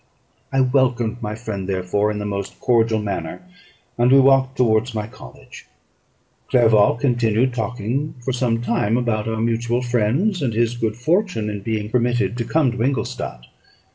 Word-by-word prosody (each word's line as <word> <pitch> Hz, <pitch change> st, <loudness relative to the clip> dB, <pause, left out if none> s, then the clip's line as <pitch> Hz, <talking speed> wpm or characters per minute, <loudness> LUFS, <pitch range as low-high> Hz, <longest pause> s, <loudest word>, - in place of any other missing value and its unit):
I 135 Hz, -, +2 dB
welcomed 125 Hz, -3 st, +1 dB
my 105 Hz, -1 st, -4 dB
friend, 105 Hz, -4 st, -5 dB
therefore, 95 Hz, +2 st, 0 dB
in 105 Hz, -, -3 dB
the 105 Hz, -, -4 dB
most 100 Hz, -1 st, -5 dB
cordial 115 Hz, -2 st, +2 dB
manner, 105 Hz, -, -4 dB, 0.6 s
and 120 Hz, +1 st, +4 dB
we 135 Hz, -, +7 dB
walked 135 Hz, 0 st, +3 dB
towards 115 Hz, 0 st, +2 dB
my 105 Hz, -1 st, -2 dB
college. 70 Hz, -, -13 dB, 0.8 s
Clerval 110 Hz, -4 st, +4 dB
continued 120 Hz, -1 st, +1 dB
talking 125 Hz, +5 st, -3 dB
for 130 Hz, -, -1 dB
some 120 Hz, -2 st, 0 dB
time 120 Hz, -1 st, +1 dB
about 115 Hz, -3 st, -1 dB
our 110 Hz, 0 st, -2 dB
mutual 115 Hz, +2 st, 0 dB
friends, 125 Hz, -, 0 dB
and 120 Hz, -6 st, -1 dB
his 115 Hz, 0 st, +1 dB
own 120 Hz, -, -9 dB
good 110 Hz, -1 st, 0 dB
fortune 155 Hz, -, 0 dB
in 105 Hz, -, -5 dB
being 105 Hz, 0 st, -2 dB
permitted 120 Hz, 0 st, +1 dB
to 120 Hz, -, -2 dB
come 150 Hz, -3 st, +2 dB
to 115 Hz, -, -5 dB
Ingolstadt. 110 Hz, -, -3 dB
115 Hz, 165 wpm, -21 LUFS, 110-125 Hz, 0.8 s, we